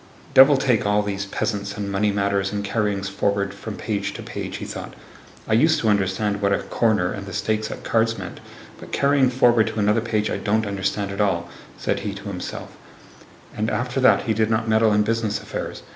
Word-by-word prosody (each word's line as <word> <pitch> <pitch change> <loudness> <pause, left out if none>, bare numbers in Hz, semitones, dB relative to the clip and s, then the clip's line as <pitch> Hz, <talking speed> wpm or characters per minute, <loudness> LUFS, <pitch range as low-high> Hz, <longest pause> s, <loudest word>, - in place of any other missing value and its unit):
"Devil 135 +1 +8
take 125 -4 +2
all 105 0 +2
these 100 -1 -3
peasants, 100 0 -3
and 100 -1 -3
money 105 +1 +1
matters, 100 -1 0
and 100 0 -3
carryings 100 -2 -1
forward 100 0 -1
from 105 +1 -7
page 100 -2 -3
to - - -7
page," - - -6
he - - -6
thought. - - -7 0.5
"I - - 0
used 155 +8 +4
to 110 - +2
understand 100 +1 0
what 100 0 +2
a - - +3
'corner' 105 -6 +1
and 100 -1 -7
the 100 - -7
stakes 110 +3 -1
at - - -7
cards 115 0 +1
meant, 95 -2 -7 0.4
but - - -11
carrying 140 -2 +3
forward 120 -3 +4
to - - -3
another 105 +2 +2
page 110 -2 -1
I - - -1
don't 110 +1 0
understand 100 0 -2
at 100 +1 -2
all," 85 -4 0 0.3
said - - -1
he 100 -1 -4
to 100 +1 -7
himself, 90 -2 -6 0.8
and 110 +1 -1
after 125 +2 -1
that 130 - +5
he 110 - 0
did 110 0 +1
not 115 0 0
meddle 110 0 +4
in 105 0 +3
business 110 -1 -1
affairs. - - -6
105 Hz, 205 wpm, -23 LUFS, 100-110 Hz, 0.8 s, Devil